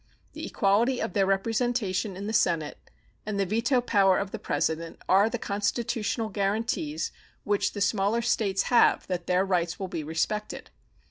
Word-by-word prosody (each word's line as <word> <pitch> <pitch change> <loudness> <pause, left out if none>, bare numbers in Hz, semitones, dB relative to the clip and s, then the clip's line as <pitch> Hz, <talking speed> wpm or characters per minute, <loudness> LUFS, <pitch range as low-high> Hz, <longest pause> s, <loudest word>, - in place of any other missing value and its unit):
The - - -6
equality 230 +6 +2
of 225 - -3
their 195 -2 +2
representation 205 -1 0
in 200 - -6
the 220 - -3
Senate 165 -8 +1 0.4
and 205 -1 -3
the 195 - +2
veto 230 +6 +1
power 195 -5 +3
of 195 -1 -3
the - - -5
President 165 +1 -2
are 200 +3 +5
the 240 - -3
constitutional 220 +2 -2
guaranties 195 -6 -1 0.3
which 205 -1 0
the 205 - -5
smaller 205 +3 +1
States 200 -4 +1
have 240 - +5
that 180 -2 -4
their 180 +1 +2
rights 175 -3 0
will 190 -1 -5
be 160 - -4
respected. 165 +8 -3
200 Hz, 160 wpm, -27 LUFS, 185-225 Hz, 0.4 s, are